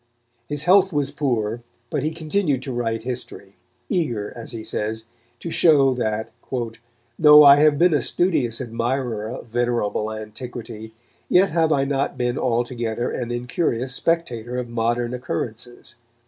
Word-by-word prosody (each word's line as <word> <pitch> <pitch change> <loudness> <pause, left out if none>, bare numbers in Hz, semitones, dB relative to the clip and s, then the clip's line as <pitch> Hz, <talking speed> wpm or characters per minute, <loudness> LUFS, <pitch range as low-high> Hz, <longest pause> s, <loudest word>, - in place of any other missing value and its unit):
His 145 0 0
health 190 +2 +5
was 145 -3 -1
poor, 120 -6 -1 0.3
but - - -1
he 155 - -1
continued 160 -4 -1
to 135 - -5
write 115 -2 -2
history, 120 -5 -6 0.3
eager, 120 - -2
as 115 - -8
he 115 -2 -6
says, 110 +1 -3 0.4
to 170 - -5
show 140 -6 +4
that 110 -2 -2 0.9
"though 150 -1 +9
I 140 0 +9
have 150 0 +4
been 175 +2 +4
a 145 - +2
studious 130 -9 0
admirer 120 -2 -2
of 125 - -7
venerable 115 -2 -1
antiquity, 110 0 -8 0.3
yet 190 0 +4
have 165 -1 +2
I 135 -2 +2
not 140 0 -1
been 125 0 -1
altogether 120 -1 -1
an 120 -2 -4
incurious 125 +1 -2
spectator 125 -7 -1
of 125 -1 -4
modern 120 +1 -1
occurrences." 120 -1 -5
125 Hz, 145 wpm, -22 LUFS, 115-145 Hz, 0.9 s, though